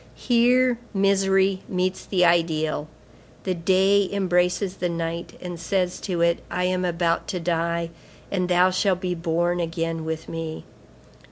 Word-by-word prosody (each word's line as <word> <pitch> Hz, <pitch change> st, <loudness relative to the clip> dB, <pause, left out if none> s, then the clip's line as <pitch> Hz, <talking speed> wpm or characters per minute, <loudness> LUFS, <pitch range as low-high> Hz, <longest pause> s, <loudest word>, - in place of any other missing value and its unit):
Here 245 Hz, 0 st, +3 dB, 0.2 s
misery 195 Hz, -1 st, +2 dB
meets 185 Hz, 0 st, -1 dB
the 180 Hz, -3 st, +3 dB
ideal. 160 Hz, -3 st, +1 dB, 0.6 s
The 185 Hz, -, 0 dB
day 190 Hz, +3 st, +3 dB
embraces 180 Hz, 0 st, +1 dB
the 180 Hz, -, -1 dB
night, 170 Hz, 0 st, -4 dB
and 175 Hz, -2 st, -7 dB
says 180 Hz, +1 st, -1 dB
to 180 Hz, -4 st, -2 dB
it: 170 Hz, 0 st, +3 dB
'I 180 Hz, -, -1 dB
am 185 Hz, 0 st, 0 dB
about 170 Hz, -1 st, 0 dB
to 185 Hz, -, -3 dB
die, 170 Hz, 0 st, -1 dB, 0.4 s
and 180 Hz, -2 st, -1 dB
thou 180 Hz, +1 st, +4 dB
shalt 185 Hz, 0 st, +1 dB
be 180 Hz, -1 st, -2 dB
born 170 Hz, +1 st, 0 dB
again 165 Hz, -1 st, -2 dB
with 160 Hz, 0 st, -4 dB
me. 165 Hz, -1 st, -5 dB
180 Hz, 145 wpm, -24 LUFS, 170-190 Hz, 0.6 s, thou